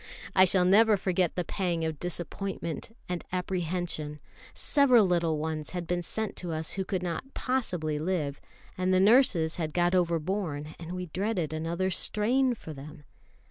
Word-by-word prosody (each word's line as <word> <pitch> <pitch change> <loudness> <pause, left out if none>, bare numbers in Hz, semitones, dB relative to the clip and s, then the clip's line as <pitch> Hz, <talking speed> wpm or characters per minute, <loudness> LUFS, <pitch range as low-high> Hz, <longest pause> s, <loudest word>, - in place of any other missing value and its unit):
I 185 0 +8
shall 180 0 +3
never 210 +3 +6
forget 185 -2 0
the 180 - 0
pang 175 -2 -1
of 160 -2 -3
disappointment 175 +1 -3 0.2
and 180 -1 -3
apprehension. 175 -4 -2 0.3
Several 255 -7 +4
little 170 -3 +1
ones 155 +1 -3
had 175 -1 -3
been 175 +1 -1
sent 220 +5 -3
to 175 -2 -4
us 160 0 -3
who 195 - -2
could 185 -1 -2
not 180 +10 -4
possibly 180 - -1
live; 155 -4 -2 0.3
and 185 0 0
the 185 - +4
nurses 195 -7 +4
had 155 -3 -3
got 175 0 +3
overborne, 170 -3 0
and 170 +1 -6
we 180 0 -4
dreaded 180 -2 -2
another 170 +4 -1
strain 245 +7 +2
for 160 -7 -9
them. 145 +1 -10
180 Hz, 160 wpm, -29 LUFS, 160-190 Hz, 0.3 s, I